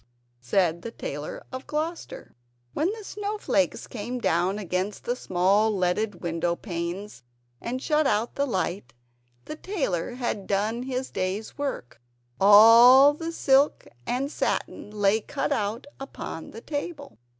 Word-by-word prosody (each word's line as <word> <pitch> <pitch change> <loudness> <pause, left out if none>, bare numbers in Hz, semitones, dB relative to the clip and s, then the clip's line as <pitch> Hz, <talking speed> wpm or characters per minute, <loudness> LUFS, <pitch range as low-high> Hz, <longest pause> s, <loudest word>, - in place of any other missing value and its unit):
said 170 +6 +1
the 230 - -6
Tailor 150 -9 -6
of 260 0 -7
Gloucester. 335 +11 -5 0.4
When 330 +6 0
the 440 0 -8
snow 415 +1 -4
flakes 290 -8 0
came 240 +2 -5
down 185 -3 +1
against 190 0 -3
the 245 - -1
small 195 0 +2
leaded 190 0 -1
window 170 0 -1
panes 175 - -5 0.4
and 250 +2 -3
shut 300 +1 +1
out 215 +3 0
the 280 0 -1
light, 185 - -3 0.5
the - - -6
tailor 270 - -2
had 235 -6 -3
done 210 +4 0
his 260 0 -4
day's 190 +4 -3
work; 270 - -5 0.4
all 230 +7 +8
the 325 +2 -5
silk 280 -2 +2 0.2
and 270 +4 -1
satin - - -2
lay 210 +1 +1
cut 285 +6 -3
out 210 +3 -1
upon 270 -11 -7
the 225 - -10
table. 285 0 -6
220 Hz, 140 wpm, -26 LUFS, 190-275 Hz, 0.5 s, all